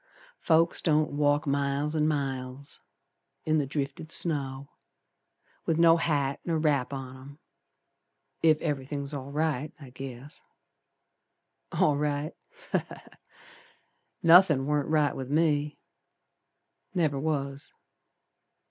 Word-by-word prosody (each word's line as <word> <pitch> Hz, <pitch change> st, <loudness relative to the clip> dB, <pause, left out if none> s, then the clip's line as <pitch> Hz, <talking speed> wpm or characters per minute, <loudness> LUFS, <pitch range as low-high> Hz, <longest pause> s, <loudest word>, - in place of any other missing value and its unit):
Folks 165 Hz, +1 st, +3 dB
don't 155 Hz, -2 st, +2 dB
walk 145 Hz, 0 st, +2 dB
miles 140 Hz, +2 st, 0 dB
an' 155 Hz, -1 st, +2 dB
miles 135 Hz, -2 st, -3 dB, 0.7 s
In 155 Hz, 0 st, +2 dB
the 140 Hz, -, -1 dB
drifted 140 Hz, +2 st, -4 dB
snow, 140 Hz, -5 st, -1 dB, 1.0 s
With 160 Hz, -, +2 dB
no 165 Hz, 0 st, +6 dB
hat 145 Hz, -4 st, 0 dB
nor 165 Hz, -2 st, 0 dB
wrap 145 Hz, -5 st, +1 dB
on 135 Hz, -2 st, -6 dB
'em 140 Hz, +3 st, -13 dB, 1.0 s
Ef 160 Hz, -2 st, +6 dB
everythin's 140 Hz, -1 st, -3 dB
all 140 Hz, -1 st, -5 dB
right, 150 Hz, -1 st, -1 dB
I 135 Hz, -4 st, -12 dB
guess. 135 Hz, +2 st, -7 dB, 1.3 s
All 150 Hz, -2 st, +2 dB
right? 145 Hz, +1 st, -1 dB, 0.4 s
Ha! -, -, +3 dB
Ha! -, -, -10 dB
Ha! -, -, -16 dB, 1.2 s
Nothin' 165 Hz, -5 st, +7 dB
warn't 150 Hz, 0 st, 0 dB
right 150 Hz, -3 st, +2 dB
with 130 Hz, -1 st, -5 dB
me. 150 Hz, -1 st, +1 dB, 1.2 s
Never 155 Hz, -6 st, +1 dB
was. 140 Hz, -2 st, -2 dB
145 Hz, 110 wpm, -28 LUFS, 140-155 Hz, 1.3 s, Nothin